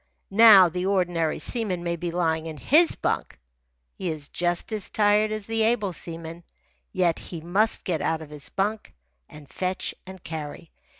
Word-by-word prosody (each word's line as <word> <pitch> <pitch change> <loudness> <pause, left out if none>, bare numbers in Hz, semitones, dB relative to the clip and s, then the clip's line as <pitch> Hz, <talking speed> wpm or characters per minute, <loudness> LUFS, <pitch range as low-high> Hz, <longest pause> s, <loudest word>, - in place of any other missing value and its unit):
Now 200 -3 +8
the 180 +2 -3
ordinary 175 -5 0
seaman 205 -8 -1
may 170 0 -1
be 175 +1 -4
lying 165 -2 -1
in 155 -2 -7
his 320 - +4
bunk. - - -3 0.5
He 185 - -4
is 150 -3 -6
just 175 +5 -1
as 210 -3 -2
tired 210 0 +2
as 215 -1 -4
the 225 +1 -1
able 220 -4 +1
seaman. 165 0 -7 0.5
Yet 180 -4 +1
he 170 - -8
must 195 +7 +1
get 170 -5 -1
out 160 0 -1
of 150 - -14
his 150 -1 -3
bunk 205 +3 -3 0.3
and 150 -1 -13
fetch 185 +6 -3
and 190 -1 -11
carry. 160 0 -7
180 Hz, 170 wpm, -25 LUFS, 165-205 Hz, 0.5 s, Now